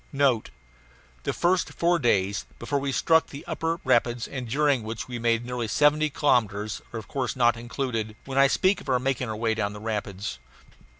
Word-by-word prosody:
NOTE: 135 Hz, -5 st, +2 dB, 0.8 s
The -, -, +1 dB
first 180 Hz, +1 st, +1 dB
four 170 Hz, 0 st, +2 dB
days, 100 Hz, -5 st, +1 dB
before 140 Hz, +4 st, -1 dB
we 140 Hz, 0 st, -2 dB
struck 160 Hz, +4 st, +3 dB
the 140 Hz, -, -9 dB
upper 165 Hz, +1 st, -2 dB
rapids, 120 Hz, -2 st, +2 dB
and 130 Hz, -4 st, -6 dB
during 140 Hz, 0 st, +2 dB
which 110 Hz, 0 st, -5 dB
we 120 Hz, -1 st, -5 dB
made 115 Hz, 0 st, +1 dB
nearly 125 Hz, -2 st, -3 dB
seventy 150 Hz, +5 st, +3 dB
kilometres, 110 Hz, -8 st, +1 dB
are 120 Hz, -, -5 dB
of 110 Hz, -, -7 dB
course 135 Hz, -2 st, -2 dB
not 120 Hz, -2 st, +4 dB
included 115 Hz, -2 st, -3 dB
when 135 Hz, 0 st, -1 dB
I 140 Hz, -, +7 dB
speak 185 Hz, +7 st, +2 dB
of -, -, -9 dB
our 130 Hz, -, +4 dB
making 125 Hz, -1 st, -1 dB
our 110 Hz, -, -3 dB
way 110 Hz, +1 st, 0 dB
down 105 Hz, -2 st, -2 dB
the 105 Hz, -, -8 dB
rapids. 105 Hz, -, -4 dB
125 Hz, 190 wpm, -26 LUFS, 110-140 Hz, 0.8 s, I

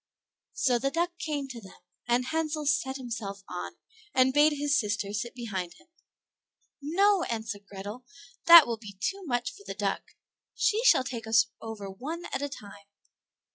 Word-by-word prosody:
So 245 Hz, -3 st, +2 dB
the 275 Hz, +3 st, 0 dB
duck 345 Hz, +3 st, -1 dB
came 290 Hz, -3 st, -3 dB
to 240 Hz, -3 st, -8 dB
them, 190 Hz, -, -13 dB, 0.3 s
and 245 Hz, +1 st, +2 dB
Hansel 310 Hz, 0 st, -2 dB
sat 295 Hz, -2 st, +1 dB
himself 220 Hz, -6 st, -6 dB
on, 180 Hz, -, -6 dB, 0.4 s
and 260 Hz, 0 st, +4 dB
bade 295 Hz, +2 st, +5 dB
his 290 Hz, 0 st, +1 dB
sister 205 Hz, -2 st, -2 dB
sit 235 Hz, +3 st, -4 dB
behind 190 Hz, -8 st, -5 dB
him. -, -, -22 dB, 0.9 s
"No," 385 Hz, +6 st, +3 dB
answered 220 Hz, -3 st, -5 dB
Grethel, 205 Hz, +5 st, -8 dB, 0.4 s
"that 335 Hz, -3 st, +11 dB
will 235 Hz, -1 st, -3 dB
be 205 Hz, -3 st, -11 dB
too 390 Hz, -, -2 dB
much 245 Hz, -4 st, -1 dB
for 405 Hz, -, -15 dB
the -, -, -7 dB
duck, -, -, -3 dB, 0.4 s
she 465 Hz, 0 st, +2 dB
shall 370 Hz, -, +6 dB
take 235 Hz, -4 st, -6 dB
us 220 Hz, 0 st, +5 dB, 0.2 s
over 220 Hz, -3 st, -6 dB
one 295 Hz, -, -6 dB
at -, -, -1 dB
a 285 Hz, -, -2 dB
time." 200 Hz, -6 st, -11 dB
250 Hz, 170 wpm, -28 LUFS, 215-300 Hz, 0.9 s, that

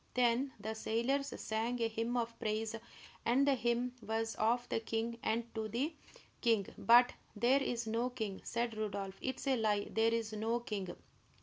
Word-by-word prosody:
Then 250 Hz, +2 st, +3 dB
the 215 Hz, +2 st, -3 dB
sailors 235 Hz, +6 st, 0 dB
sang 225 Hz, +3 st, -1 dB
a 230 Hz, -, +2 dB
hymn 230 Hz, +2 st, -1 dB
of 230 Hz, -1 st, -2 dB
praise, 220 Hz, +1 st, -1 dB, 0.5 s
and 255 Hz, +4 st, +4 dB
the 280 Hz, -, +5 dB
hymn 240 Hz, 0 st, 0 dB
was 225 Hz, 0 st, -1 dB
of 240 Hz, +3 st, +1 dB
the -, -, 0 dB
king 225 Hz, +1 st, -2 dB
and 230 Hz, +1 st, -1 dB
to 220 Hz, -1 st, -2 dB
the 255 Hz, +9 st, -1 dB, 0.5 s
king. 225 Hz, -5 st, +3 dB
"But 240 Hz, +1 st, +6 dB, 0.2 s
there 250 Hz, +6 st, +4 dB
is 240 Hz, -3 st, -1 dB
no 230 Hz, +3 st, 0 dB
king!" 220 Hz, -6 st, -4 dB
cried 235 Hz, -1 st, 0 dB
Rodolph. 200 Hz, -3 st, -3 dB
"It 260 Hz, -, -2 dB
is -, -, -7 dB
a 270 Hz, -2 st, +3 dB
lie; 210 Hz, -2 st, +1 dB
there 225 Hz, +1 st, +3 dB
is 225 Hz, -1 st, -1 dB
no 225 Hz, +2 st, 0 dB
king!" 205 Hz, -6 st, -4 dB
230 Hz, 180 wpm, -35 LUFS, 220-245 Hz, 0.5 s, But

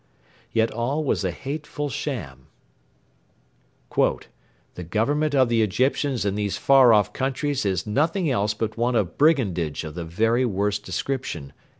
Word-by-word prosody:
Yet 115 Hz, 0 st, +1 dB
all 130 Hz, +7 st, -1 dB
was 135 Hz, -, 0 dB
a 95 Hz, -, 0 dB
hateful 145 Hz, -, -5 dB
sham 85 Hz, -, -5 dB, 1.5 s
['The 90 Hz, -, -3 dB
government 145 Hz, -, +1 dB
of 130 Hz, -2 st, +4 dB
the 115 Hz, -1 st, +2 dB
Egyptians 130 Hz, +4 st, 0 dB
in 100 Hz, -, +1 dB
these 105 Hz, -1 st, -2 dB
far 135 Hz, -3 st, +6 dB
off 105 Hz, -3 st, +3 dB
countries 135 Hz, -2 st, -1 dB
is 95 Hz, -1 st, -1 dB
nothing 160 Hz, -, 0 dB
else 105 Hz, -6 st, 0 dB
but 110 Hz, +1 st, -3 dB
one 120 Hz, +1 st, +1 dB
of 105 Hz, -6 st, -1 dB
brigandage 100 Hz, -, +2 dB
of 80 Hz, -1 st, -7 dB
the 85 Hz, +1 st, -5 dB
very 115 Hz, +9 st, +1 dB
worst 105 Hz, -2 st, -1 dB
description.' 90 Hz, -, -4 dB
115 Hz, 140 wpm, -24 LUFS, 100-140 Hz, 1.5 s, far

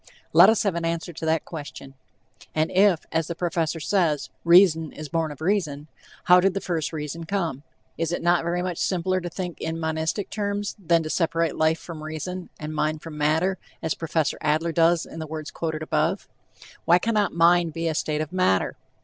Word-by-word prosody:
Let -, -, +8 dB
us 220 Hz, -, +2 dB
have 200 Hz, -3 st, +1 dB
an 170 Hz, 0 st, -3 dB
answer 170 Hz, +1 st, -2 dB
to 160 Hz, -, -6 dB
that 160 Hz, 0 st, +1 dB
question. 145 Hz, -4 st, -8 dB, 0.6 s
And 155 Hz, +1 st, +1 dB
if, 190 Hz, -3 st, +3 dB
as 165 Hz, -1 st, 0 dB
the 170 Hz, -, -4 dB
professor 165 Hz, -2 st, -1 dB
says, 160 Hz, -3 st, 0 dB
"reason 170 Hz, -3 st, +5 dB
is 155 Hz, -1 st, -8 dB
born 165 Hz, -1 st, -1 dB
of 145 Hz, -, -11 dB
reason," 160 Hz, -5 st, -1 dB, 0.3 s
how 180 Hz, 0 st, +7 dB
did 190 Hz, +1 st, +2 dB
the -, -, 0 dB
first 170 Hz, -5 st, -2 dB
reason 160 Hz, +1 st, -5 dB
come? 165 Hz, -7 st, -2 dB, 0.4 s
Is 165 Hz, 0 st, 0 dB
it 175 Hz, -, -3 dB
not 175 Hz, 0 st, +3 dB
very 175 Hz, +1 st, -1 dB
much 180 Hz, -2 st, -3 dB
simpler 185 Hz, 0 st, 0 dB
to 175 Hz, -, -4 dB
think 180 Hz, -1 st, -6 dB
in 160 Hz, 0 st, -3 dB
monistic 160 Hz, +4 st, -2 dB
terms, 205 Hz, -1 st, -2 dB
than 170 Hz, -1 st, +3 dB
to 155 Hz, -, -5 dB
separate 165 Hz, -2 st, 0 dB
life 160 Hz, +1 st, +2 dB
from 165 Hz, -3 st, -9 dB
reason, 165 Hz, +4 st, -5 dB
and 155 Hz, 0 st, -5 dB
mind 155 Hz, 0 st, -1 dB
from 165 Hz, -2 st, -8 dB
matter, 160 Hz, +6 st, +1 dB, 0.2 s
as 160 Hz, -, 0 dB
Prof. 160 Hz, -2 st, -1 dB
Adler 155 Hz, +3 st, +1 dB
does 165 Hz, +1 st, +3 dB
in -, -, -9 dB
the 160 Hz, -, -5 dB
words 155 Hz, 0 st, -6 dB
quoted 160 Hz, -1 st, -3 dB
above? 160 Hz, +5 st, 0 dB, 0.6 s
Why 175 Hz, -, +6 dB
cannot 210 Hz, 0 st, 0 dB
mind 170 Hz, -1 st, +4 dB
be 165 Hz, +1 st, -2 dB
a 160 Hz, -, 0 dB
state 150 Hz, 0 st, -1 dB
of 155 Hz, +2 st, -5 dB
matter? 185 Hz, -, +1 dB
165 Hz, 200 wpm, -24 LUFS, 155-180 Hz, 0.6 s, Let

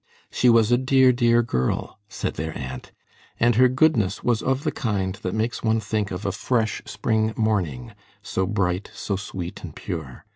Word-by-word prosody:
"She 125 Hz, -, +3 dB
was 115 Hz, -1 st, +5 dB
a 120 Hz, -, +4 dB
dear, 130 Hz, 0 st, +5 dB
dear 120 Hz, -1 st, +3 dB
girl," 65 Hz, -, -2 dB
said -, -, -3 dB
their 80 Hz, +1 st, -4 dB
aunt, 65 Hz, 0 st, -7 dB, 0.5 s
"and 120 Hz, +1 st, +4 dB
her 125 Hz, +3 st, +5 dB
goodness 130 Hz, -8 st, +2 dB
was 120 Hz, -2 st, +1 dB
of 135 Hz, +2 st, 0 dB
the 155 Hz, -, 0 dB
kind 100 Hz, -6 st, -1 dB
that 90 Hz, +3 st, -3 dB
makes 110 Hz, +2 st, -1 dB
one 110 Hz, 0 st, +2 dB
think 105 Hz, -1 st, -2 dB
of 95 Hz, +3 st, -5 dB
a 100 Hz, -, +1 dB
fresh 110 Hz, +2 st, -1 dB
spring 110 Hz, 0 st, 0 dB
morning, 90 Hz, -, -1 dB, 0.3 s
so 95 Hz, 0 st, -1 dB
bright, 95 Hz, -2 st, -1 dB
so 100 Hz, -, -2 dB
sweet, 95 Hz, -2 st, -6 dB
and -, -, -8 dB
pure. 70 Hz, -7 st, -6 dB
110 Hz, 180 wpm, -24 LUFS, 95-120 Hz, 0.5 s, was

